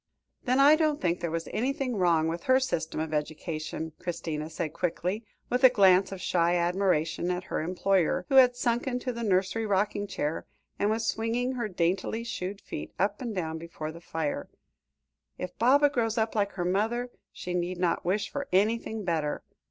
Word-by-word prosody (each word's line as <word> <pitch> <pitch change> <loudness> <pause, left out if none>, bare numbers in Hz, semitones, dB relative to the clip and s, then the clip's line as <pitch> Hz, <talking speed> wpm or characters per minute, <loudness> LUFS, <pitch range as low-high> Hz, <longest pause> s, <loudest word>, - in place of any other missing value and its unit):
"Then 255 +1 +2
I 285 +3 +8
don't 310 -2 +1
think 175 -1 0
there 170 - -2
was 165 +1 -3
anything 265 +1 -1
wrong 170 -4 +3
with 170 +1 -4
her 260 0 +5
system 165 -13 -2
of 160 0 -3
education," 155 +1 -3
Christina 160 -3 -4
said 160 -1 -4
quickly, 180 +4 -2 0.2
with 250 +2 -1
a 260 - +10
glance 190 -5 +5
of 195 - -6
shy 175 -1 +2
admiration 175 -2 +1
at 180 0 -1
her - - -3
employer, 180 +1 +1
who 270 -2 +3
had 250 -2 +7
sunk 240 +1 0
into 250 0 -2
the 235 - -5
nursery 200 +1 +1
rocking 205 +1 0
chair, 155 -4 -3 0.3
and 205 - +2
was 225 +1 0
swinging 230 +3 0
her 240 -4 -2
daintily 185 +4 -1
shod 200 -3 -5
feet 75 - -7
up 200 +5 0
and 235 -4 -4
down 160 -3 -3
before 160 -2 -6
the 170 +1 -11
fire; 160 -3 -3 0.9
"if 180 - -6
Baba 280 +5 +5
grows 230 -4 -1
up 220 0 +1
like 205 -2 0
her 175 -2 -3
mother, 225 +7 0 0.2
she 180 - -6
need 180 +1 -1
not 175 -2 0
wish 195 +4 0
for 285 -1 -5
anything 220 +2 +1
better. 160 -5 -1
190 Hz, 185 wpm, -28 LUFS, 170-230 Hz, 0.9 s, a